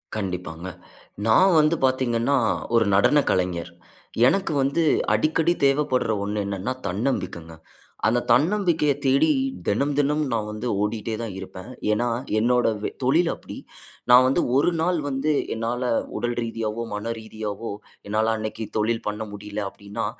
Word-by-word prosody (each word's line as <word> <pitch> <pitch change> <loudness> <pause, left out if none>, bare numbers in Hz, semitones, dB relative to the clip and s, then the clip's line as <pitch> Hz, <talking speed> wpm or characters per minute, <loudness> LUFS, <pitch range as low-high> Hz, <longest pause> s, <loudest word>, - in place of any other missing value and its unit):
கண்டிப்பாங்க. 90 -4 -4 0.6
நான் 180 - +5
வந்து 155 +2 +3
பார்த்தீங்கன்னா, 130 0 +1 0.4
ஒரு 115 -1 +4
நடன 145 +9 +4
கலைஞர். 90 -2 -1 0.6
எனக்கு 195 +5 +1
வந்து 140 +5 +1 0.3
அடிக்கடி 160 +2 +2
தேவைப்பட்ற 135 -4 +2
ஒண்ணு 105 0 -2
என்னனா, 100 +5 -3
தன்னம்பிக்கைங்க. 90 -6 -3 0.5
அந்த 120 +3 +3
தன்னம்பிக்கைய 160 - +3
தேடி, 140 +4 +3 0.4
தினம், 140 +8 +1
தினம் 145 +1 +2
நான் 110 -2 -1
வந்து 105 +3 -5
ஓடிட்டே 110 +2 -2
தான் 115 -2 -4
இருப்பேன். 95 +2 -9 0.2
ஏனா, 115 +3 +1 0.3
என்னோட 125 +2 +2 0.2
வே - - 0
தொழில் 160 +7 +3
அப்பிடி. - - -10 0.5
நான் 125 +1 +8
வந்து 135 - +2
"1 140 - +4
நாள் 175 0 +1
வந்து 140 +2 0 0.2
என்னால 115 +2 -2 0.4
உடல் 120 0 -2
ரீதியாவோ, 115 -1 -3
மன 105 +3 -3
ரீதியாவோ, 110 0 -6 0.4
என்னால 110 +2 +1
அன்னக்கி 110 +1 -4
தொழில் 115 +2 0
பண்ண 105 +1 -3
முடியல," 105 +1 -6
அப்பிடின்னா, 100 +3 -6
115 Hz, 135 wpm, -24 LUFS, 105-140 Hz, 0.6 s, நான்